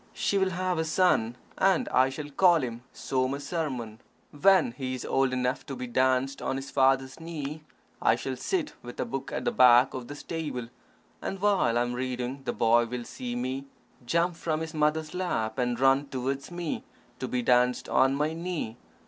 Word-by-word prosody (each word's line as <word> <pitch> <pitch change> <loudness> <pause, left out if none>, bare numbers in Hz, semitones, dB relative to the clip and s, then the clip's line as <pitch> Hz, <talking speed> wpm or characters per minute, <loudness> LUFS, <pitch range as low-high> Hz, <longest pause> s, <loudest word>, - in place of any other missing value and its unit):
She 200 - +1
will 190 0 +2
have 185 -1 -1
a - - +2
son, 160 -9 +2 0.2
and 190 -2 +3
I 130 +1 +4
shall 145 +2 -7
call 170 0 +4
him 120 -1 -4
Somasarman. 135 -3 -2 0.3
When 185 -1 +4
he 130 +1 -4
is 125 - -6
old 135 -1 +2
enough 125 +1 -1
to 135 - -5
be 125 0 -5
danced 130 +2 +1
on - - -1
his 135 +1 -6
father's 135 +1 +2
knee, 155 -2 -5 0.4
I - - +4
shall 130 - -4
sit 335 - -2
with 120 0 -10
a - - 0
book 135 -1 -5
at - - -3
the 240 - +2
back 125 - +6
of 125 -2 -6
the 145 - -7
stable, 145 -7 -5 0.5
and 195 - -4
while 195 - +2
I 120 - +3
am 120 0 -3
reading, 125 +1 -3
the - - 0
boy 115 +1 +3
will 125 +1 -4
see 120 +1 -6
me, 130 +2 -3 0.4
jump 170 +7 +1
from 160 -1 -1
his 160 0 -5
mother's 155 0 0
lap, 155 -11 -2
and 120 -1 0
run 135 +2 +4
towards 135 +1 -3
me 175 -2 -4 0.4
to 130 - -3
be 125 0 -1
danced 125 0 +3
on 135 +1 +3
my 150 +2 0
knee. 165 -9 -4
135 Hz, 190 wpm, -28 LUFS, 125-160 Hz, 0.5 s, back